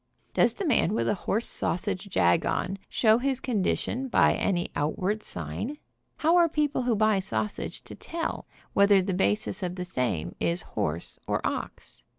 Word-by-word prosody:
Does -, -, +4 dB
the 400 Hz, -, -4 dB
man 225 Hz, -, +2 dB
with -, -, 0 dB
a -, -, +3 dB
horse 210 Hz, +3 st, -1 dB
sausage 190 Hz, +2 st, -2 dB
jag 90 Hz, -, +3 dB
on 195 Hz, +2 st, -1 dB
show 220 Hz, 0 st, +4 dB
his 265 Hz, 0 st, 0 dB
con 240 Hz, -7 st, -1 dB
dition 260 Hz, +7 st, -1 dB
by -, -, +4 dB
any 175 Hz, -3 st, -1 dB
outward 185 Hz, +8 st, -1 dB
sign? 280 Hz, +7 st, -4 dB, 0.4 s
How 330 Hz, +3 st, +4 dB
are 340 Hz, -1 st, +5 dB
people 300 Hz, -3 st, 0 dB
who 245 Hz, -2 st, +1 dB
buy 215 Hz, -1 st, +3 dB
sausage 200 Hz, +2 st, -3 dB
to -, -, -10 dB
tell 335 Hz, 0 st, -4 dB, 0.3 s
whether 200 Hz, -1 st, +5 dB
the 190 Hz, 0 st, -1 dB
basis 105 Hz, -, 0 dB
of 180 Hz, -1 st, -3 dB
the 180 Hz, -1 st, -4 dB
same 110 Hz, -, -2 dB
is 170 Hz, 0 st, 0 dB
horse 80 Hz, +2 st, -2 dB
or -, -, +1 dB
ox? -, -, -5 dB
200 Hz, 170 wpm, -27 LUFS, 175-245 Hz, 0.4 s, are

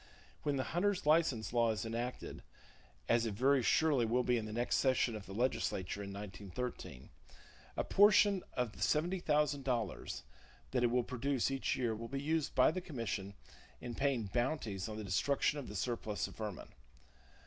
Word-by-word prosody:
When 145 Hz, -1 st, 0 dB
the 130 Hz, -, 0 dB
hunter's 190 Hz, +1 st, +1 dB
license 150 Hz, -9 st, +2 dB
law 120 Hz, -1 st, +3 dB
is 110 Hz, -1 st, -1 dB
enacted, 120 Hz, +2 st, -4 dB, 0.7 s
as 115 Hz, -1 st, +3 dB
it 105 Hz, -, -3 dB
very 135 Hz, +4 st, +4 dB
surely 145 Hz, +1 st, +3 dB
will 120 Hz, +3 st, +2 dB
be 125 Hz, -1 st, +2 dB
at 110 Hz, -, -5 dB
the -, -, -6 dB
next 120 Hz, +2 st, 0 dB
session 130 Hz, -3 st, +2 dB
of 105 Hz, -2 st, -8 dB
the -, -, -9 dB
legislature 100 Hz, -5 st, -1 dB
(1913), 100 Hz, -, -6 dB, 0.7 s
a -, -, +1 dB
portion 205 Hz, -1 st, +5 dB
of 125 Hz, -3 st, -1 dB
the -, -, -15 dB
$70,000 150 Hz, -, 0 dB, 0.5 s
that 125 Hz, -2 st, +1 dB
it -, -, +5 dB
will 125 Hz, +1 st, +2 dB
produce 130 Hz, +2 st, -1 dB
each 135 Hz, -1 st, 0 dB
year 120 Hz, -3 st, 0 dB
will 115 Hz, +2 st, -6 dB
be 135 Hz, +3 st, -3 dB
used 155 Hz, +1 st, -1 dB
by -, -, +6 dB
the 185 Hz, -, -3 dB
commission 115 Hz, -, -4 dB, 0.4 s
in 120 Hz, -, -6 dB
paying 135 Hz, -2 st, +1 dB
bounties 115 Hz, -2 st, -2 dB
on 110 Hz, -, -5 dB
the 110 Hz, -, -5 dB
destruction 140 Hz, +10 st, +1 dB
of 140 Hz, -, -7 dB
the 105 Hz, -, -8 dB
surplus 110 Hz, 0 st, -2 dB
of -, -, -12 dB
vermin. 105 Hz, -4 st, -6 dB
125 Hz, 170 wpm, -35 LUFS, 110-140 Hz, 0.7 s, by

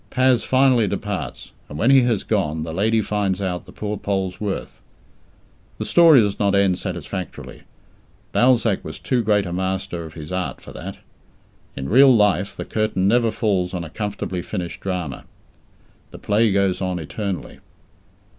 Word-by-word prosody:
Paz 130 Hz, -2 st, +3 dB
finally 130 Hz, -4 st, +3 dB
departs, 100 Hz, +1 st, -4 dB, 0.2 s
and 75 Hz, -, -7 dB
when 115 Hz, -, +3 dB
he 135 Hz, -1 st, +7 dB
has 120 Hz, -5 st, +1 dB
gone, 80 Hz, -7 st, -1 dB
the 80 Hz, 0 st, -5 dB
lady 110 Hz, +5 st, +1 dB
finds 100 Hz, -3 st, -1 dB
out 90 Hz, -3 st, -3 dB
the -, -, -11 dB
poor 105 Hz, 0 st, -4 dB
Pole's 95 Hz, -2 st, -2 dB
worth. 100 Hz, -2 st, -4 dB, 1.0 s
The -, -, -4 dB
story 165 Hz, -5 st, +7 dB
does 100 Hz, -2 st, -1 dB
not 100 Hz, -1 st, +2 dB
end 95 Hz, -2 st, +2 dB
satisfactorily. 90 Hz, 0 st, -6 dB, 0.7 s
Balzac 120 Hz, -5 st, +3 dB
was 80 Hz, -, -7 dB
too 120 Hz, +10 st, 0 dB
great 105 Hz, -2 st, +2 dB
a 85 Hz, -, -5 dB
master 95 Hz, -2 st, -3 dB
of 80 Hz, -1 st, -10 dB
his 80 Hz, 0 st, -8 dB
art 90 Hz, 0 st, -3 dB
for -, -, -12 dB
that. -, -, -7 dB, 0.8 s
In 70 Hz, 0 st, -5 dB
real 130 Hz, +3 st, +6 dB
life 100 Hz, -2 st, +2 dB
the -, -, -5 dB
curtain 110 Hz, -3 st, 0 dB
never 115 Hz, +2 st, +3 dB
falls 95 Hz, -5 st, -1 dB
on 90 Hz, -, -3 dB
a 80 Hz, -, -9 dB
comfortably 100 Hz, -3 st, -4 dB
finished 90 Hz, -2 st, -5 dB
drama. 90 Hz, -8 st, -4 dB, 0.9 s
The -, -, -11 dB
play 105 Hz, +1 st, +2 dB
goes 95 Hz, -1 st, +1 dB
on 90 Hz, -1 st, -1 dB
eternally. 95 Hz, +4 st, -5 dB
100 Hz, 165 wpm, -21 LUFS, 90-110 Hz, 1.0 s, he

